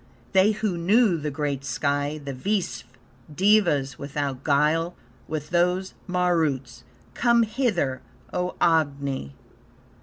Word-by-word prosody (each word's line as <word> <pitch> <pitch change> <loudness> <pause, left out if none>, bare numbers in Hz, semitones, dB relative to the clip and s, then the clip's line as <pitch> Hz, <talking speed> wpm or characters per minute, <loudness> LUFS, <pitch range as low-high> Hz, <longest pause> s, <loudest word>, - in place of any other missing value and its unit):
They 195 +3 +4
who 205 -5 -2
know 205 +3 +4
the 150 -2 -3
great 140 -2 -3
sky, 145 +1 -1
the 140 -2 -6
Visve 190 - -2 0.5
Devas 175 -9 +3
without 140 -2 -3
guile; 155 +4 +2 0.3
with 155 0 -5
those 180 +2 +1
Maruts 160 -9 0 0.3
Come 235 - +3
hither, 210 - -1 0.3
O 180 0 -2
Agni! 140 - 0
160 Hz, 110 wpm, -25 LUFS, 140-185 Hz, 0.5 s, They